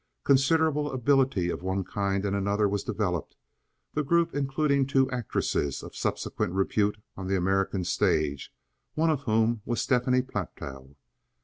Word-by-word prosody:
Considerable 150 +2 +3
ability 130 -8 +2
of - - -5
one 95 +1 -1
kind 100 +1 -1
and 100 0 0
another 100 +1 +1
was 100 0 -1
developed, 90 -7 -2 0.6
the 150 - 0
group 170 +3 +2
including 140 0 +1
two 135 -1 +3
actresses 115 - -1
of - - -10
subsequent - - -2
repute 100 +2 +1 0.2
on 95 -1 -6
the 95 0 +1
American 95 +1 0
stage, 75 -4 0 0.4
one 160 +1 +3
of 145 -3 -1
whom 110 0 +2
was 120 0 -2
Stephanie 125 0 +2
Platow. 70 - -7
110 Hz, 140 wpm, -27 LUFS, 95-135 Hz, 0.6 s, Considerable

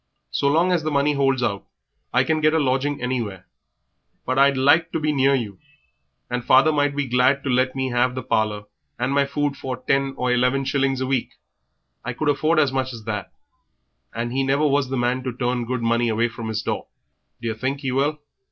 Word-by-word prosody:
So 140 - 0
long 165 +6 +3
as 175 -2 +2
the 155 - -2
money 145 0 +2
holds 135 -2 +1
out 100 -4 -1 0.5
I 125 +2 +3
can 155 +3 0
get 155 +1 +3
a - - +3
lodging 140 +1 0
anywhere, 115 -7 -3 0.8
but 130 +1 0
I'd 140 0 +4
like 145 +5 +4
to 165 - 0
be 155 0 0
near 135 -1 +3
you; 105 -7 -4 0.7
and 125 -1 -3
father 135 +6 +5
might 145 -1 +1
be 145 -1 -1
glad 130 +2 +2
to 135 - -1
let 130 +1 +1
me 130 -1 -1
have 125 +1 +1
the 130 - -4
parlour 105 -2 0 0.3
and 125 +3 -1
my 140 0 +3
food 145 0 -1
for 130 -2 -5
ten 135 0 0
or 125 0 0
eleven 125 +2 +1
shillings 135 -1 0
a - - 0
week 130 -2 -1 0.7
I 125 - -4
could 150 +5 -1
afford 155 +3 +1
as 145 -3 +3
much 130 -1 -2
as 115 -2 -9
that, 105 -3 -4 0.8
and 120 +1 -4
he 135 - +1
never 135 +3 +1
was 140 -2 +1
the 135 - -2
man 125 +1 0
to 130 0 -3
turn 125 0 -1
good 125 0 -3
money 115 +1 +1 0.2
from 115 0 -7
his 110 -1 -3
door. - - -3 0.5
Do 115 - -3
yer - - -1
think 130 +5 -3
he 135 -3 -2
will?" 140 +4 0
130 Hz, 215 wpm, -22 LUFS, 125-140 Hz, 0.8 s, father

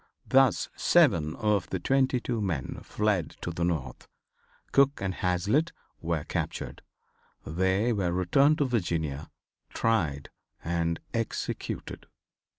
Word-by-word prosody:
Thus 130 -9 +4
seven 80 -1 +3
of 105 -3 0
the 95 - -2
twenty 135 - +2
two 120 -2 -2
men 85 -10 -3
fled 105 -7 -1
to 85 - -3
the 85 0 -3
North. 85 -3 -2 0.6
Cook 140 0 +4
and 95 -1 -2
Hazlitt 100 - +1 0.3
were 80 -2 -1
captured. - - -4 0.6
They 95 +8 +1
were 95 -5 0
returned 135 - +3
to 145 - +2
Virginia, 85 - -2 0.4
tried 80 -12 0 0.3
and 85 0 -1
executed. 115 -1 -4
95 Hz, 115 wpm, -28 LUFS, 85-115 Hz, 0.6 s, Thus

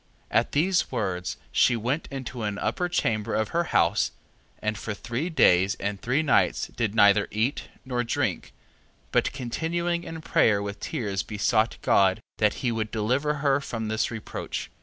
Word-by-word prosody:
At - - +2
these 180 +5 +2
words, 90 -1 -2
she 120 - +4
went 125 +7 -2
into 130 -3 -6
an 105 -2 -2
upper 145 +13 -1
chamber 110 -9 0
of 110 -1 0
her 170 +1 0
house: - - +2 0.5
and 105 0 -1
for 105 0 -5
three 120 - -3
days 95 - +4
and 100 0 -4
three 130 +6 +1
nights 155 - +2
did 110 -3 -1
neither 100 -1 +5
eat 110 +6 -1 0.2
nor 125 -2 -1
drink: 115 - -1
3:11. - - -20 0.6
But - - +2
continuing 170 +7 -2
in 165 -1 -7
prayer 105 -9 +3
with 100 0 -5
tears 100 -5 -2
besought 110 +2 +1
God, 95 0 +4 0.2
that 105 -1 +3
he 120 - +2
would 110 -1 -2
deliver 125 +8 0
her 140 0 +3
from 115 -5 -4
this 110 +1 0
reproach. 115 -2 -5
115 Hz, 165 wpm, -26 LUFS, 105-140 Hz, 0.6 s, neither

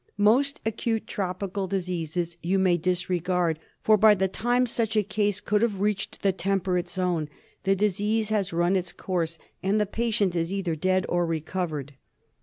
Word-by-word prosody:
Most 245 +8 +3
acute 225 0 -1
tropical 195 0 -3
diseases 175 -3 -2
you 185 +3 +1
may 185 -2 +4
disregard; 180 -1 0 0.2
for, 215 0 +5
by 215 0 +7
the 190 0 +1
time 245 +6 +1
such 225 -2 -1
a 210 - +4
case 205 0 0
could 210 0 +1
have 215 -5 +1
reached 205 -1 -2
the 195 - +4
temperate 190 -2 -1
zone, 175 -5 -1 0.4
the 195 0 +4
disease 210 +2 +1
has 205 -3 0
run 175 +3 +2
its 185 -1 -1
course, 165 -3 -2 0.2
and 200 +3 +1
the 210 - +2
patient 210 -4 0
is 165 +1 0
either 190 -4 -1
dead 185 +4 +1
or 175 -1 +1
recovered. 160 -3 -3
190 Hz, 165 wpm, -26 LUFS, 175-210 Hz, 0.4 s, by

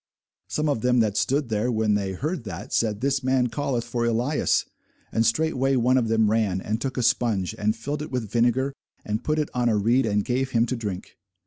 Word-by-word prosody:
Some 155 0 -1
of 140 -7 0
them 125 +1 +3
that 105 -3 0
stood 135 +1 0
there, 110 +3 0
when 110 -2 +1
they 100 -2 -1
heard 155 - -3
that, 95 -5 -7
said, 105 -3 0
This 135 0 0
man 130 -1 +2
calleth 130 -1 -2
for 120 0 -2
Elias. 120 +6 +1 0.5
And 115 - +2
straightway 135 +1 +1
one 125 +1 +3
of 125 -3 +2
them 110 -1 +2
ran, 105 -4 +1
and 110 +4 -3
took 135 0 -3
a 125 - 0
spunge, 110 -5 +1
and 105 0 0
filled 145 +6 -4
it 150 - -5
with 125 -4 -3
vinegar, 120 +3 +2 0.3
and 105 +2 -2
put 155 0 0
it 150 -1 0
on 120 -1 +1
a 110 - +2
reed, 115 +4 +2
and 105 -1 0
gave 130 +1 0
him 115 0 +3
to 125 - -2
drink. 105 -6 -6
120 Hz, 220 wpm, -25 LUFS, 110-130 Hz, 0.5 s, them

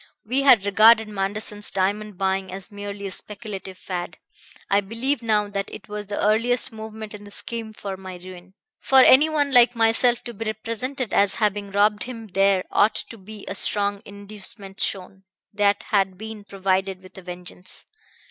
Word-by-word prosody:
We 255 +5 0
had 250 -7 +6
regarded 220 +2 +6
Manderson's 205 +1 -2
diamond 200 +1 -1
buying 190 0 -1
as 195 +3 -7
merely 205 0 -7
a 195 - -4
speculative 200 -2 -6
fad. 175 -3 -5 0.5
I 200 +1 +3
believe 230 +6 -2
now 215 -2 +1
that 200 -1 -3
it 195 - -10
was 210 0 -6
the 205 - -4
earliest 230 +4 +2
movement 220 -1 -8
in 210 0 -9
the 205 - -12
scheme 225 +1 -5
for 200 -2 -6
my 190 -1 -8
ruin. 185 +1 -12 0.2
For 270 - +3
any 265 +4 +7
one 290 -2 +1
like 245 -1 +6
myself 230 +1 +3
to 240 - -7
be 225 +1 -6
represented 230 +4 -3
as 200 -1 +4
having 205 -2 0
robbed 205 +1 +2
him 230 -3 -8
there 195 0 +3
ought 210 +2 +3 0.2
to 230 - -10
be 210 +2 -11
a - - -3
strong 200 0 +2
inducement 200 -1 -10
shown. 190 0 -1 0.3
That 205 0 +2
had 195 -2 0
been 220 0 -8
provided 190 -1 -1
with 185 - -15
a - - -11
vengeance. 180 0 -5
205 Hz, 175 wpm, -23 LUFS, 195-220 Hz, 0.5 s, any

